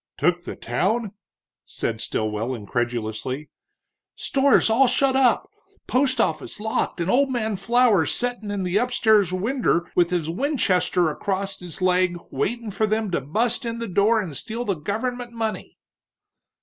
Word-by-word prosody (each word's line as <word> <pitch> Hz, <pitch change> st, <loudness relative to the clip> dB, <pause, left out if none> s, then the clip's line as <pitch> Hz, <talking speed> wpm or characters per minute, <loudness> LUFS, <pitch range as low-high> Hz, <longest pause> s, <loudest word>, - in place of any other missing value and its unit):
"Took 175 Hz, +3 st, +1 dB
the -, -, -5 dB
town?" 215 Hz, +2 st, -1 dB, 0.5 s
said 115 Hz, -1 st, -4 dB
Stilwell, 110 Hz, +3 st, -2 dB
incredulously. 120 Hz, +4 st, -3 dB, 0.6 s
"Stores 275 Hz, 0 st, +3 dB
all 240 Hz, +4 st, +4 dB
shut 265 Hz, +2 st, +2 dB
up, 260 Hz, -3 st, +3 dB, 0.4 s
post 260 Hz, -1 st, +2 dB
office 155 Hz, -2 st, -1 dB
locked 220 Hz, -3 st, -1 dB
and 170 Hz, -, -1 dB
old 270 Hz, +7 st, +3 dB
man 220 Hz, -4 st, -1 dB
Flower 220 Hz, -4 st, +3 dB
settin' 245 Hz, -4 st, -2 dB
in 200 Hz, -2 st, -2 dB
the 180 Hz, +2 st, 0 dB
upstairs 220 Hz, -5 st, +3 dB
winder 190 Hz, -2 st, 0 dB
with 175 Hz, -1 st, +3 dB
his 175 Hz, -4 st, -1 dB
Winchester 185 Hz, -, +1 dB
across 195 Hz, +4 st, -3 dB
his 180 Hz, 0 st, -6 dB
leg 180 Hz, -1 st, +2 dB
waitin' 220 Hz, -, -2 dB
for 215 Hz, +2 st, 0 dB
them 215 Hz, -2 st, -1 dB
to 170 Hz, -, 0 dB
bust 225 Hz, -, 0 dB
in 230 Hz, -1 st, -3 dB
the 230 Hz, 0 st, -4 dB
door 205 Hz, +4 st, +3 dB
and 175 Hz, -9 st, -4 dB
steal 230 Hz, -, -4 dB
the 200 Hz, -, +1 dB
gover'ment 235 Hz, +9 st, -4 dB
money!" 225 Hz, -2 st, -4 dB
205 Hz, 150 wpm, -23 LUFS, 170-235 Hz, 0.6 s, all